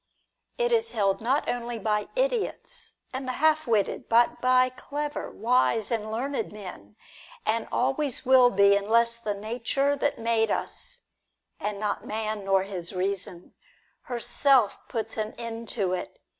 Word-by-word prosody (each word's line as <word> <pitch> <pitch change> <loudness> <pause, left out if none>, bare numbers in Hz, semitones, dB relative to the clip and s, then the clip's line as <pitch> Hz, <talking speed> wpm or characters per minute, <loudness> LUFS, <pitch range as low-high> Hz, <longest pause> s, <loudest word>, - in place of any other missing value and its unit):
It 485 0 +1
is 460 -1 +2
held 200 -2 +1
not 260 +6 +1
only 240 -1 -2
by 210 -1 0
idiots - - -1 0.2
and 260 0 -4
the 255 - -1
half 310 +1 +2
witted, 215 -4 0
but 235 +1 +4
by 255 0 +4
clever, 290 +3 -5
wise, 230 -1 +1
and 220 -2 -1
learned 265 +5 -2
men, 180 - -10 0.5
and 225 +1 +1
always 270 +1 0
will 255 -1 +7
be, 200 -1 +5
unless 230 +3 +2
the 215 -3 -3
Nature 240 +7 0
that 285 0 0
made 225 -1 +1
us - - -3 0.3
— - - -50
and 205 0 -3
not 210 -1 -1
man 215 -1 -3
nor 195 -1 +3
his 185 -2 -6
reason 185 -1 -3 0.3
— - - -39
herself 245 -1 +3
puts 225 -2 -4
an 215 0 -2
end 230 -1 -6
to 195 -6 0
it. 185 - -5
230 Hz, 155 wpm, -27 LUFS, 210-265 Hz, 0.5 s, will